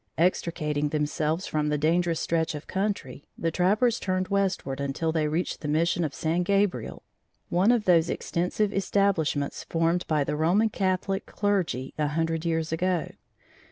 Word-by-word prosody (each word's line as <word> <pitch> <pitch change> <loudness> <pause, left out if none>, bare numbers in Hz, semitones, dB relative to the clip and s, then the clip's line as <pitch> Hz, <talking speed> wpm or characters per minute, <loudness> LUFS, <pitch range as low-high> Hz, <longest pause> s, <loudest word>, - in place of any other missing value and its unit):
Extricating 150 -4 0
themselves 155 +3 -1
from 150 -1 -1
the 150 - +1
dangerous 165 +2 +1
stretch 160 -2 0
of 150 - -7
country, 190 -10 -3
the 165 - -1
trappers 215 +8 +2
turned 185 -1 -1
westward 190 -9 0
until 140 +4 -1
they 160 -2 +1
reached 160 +4 -2
the 150 - -4
mission 170 +3 +1
of 150 -3 -3
San 165 +2 0
Gabriel, 200 +1 0 0.5
one 185 +6 +4
of 235 -3 +1
those 170 -2 +4
extensive 190 +4 -1
establishments 190 -8 0
formed 165 +2 0
by 155 -2 +2
the 145 - -2
Roman 180 +9 +3
Catholic 195 -1 -1
clergy 185 - -1
a 150 - +2
hundred 165 +2 -1
years 165 -1 0
ago. 175 +1 0
170 Hz, 155 wpm, -27 LUFS, 155-190 Hz, 0.5 s, one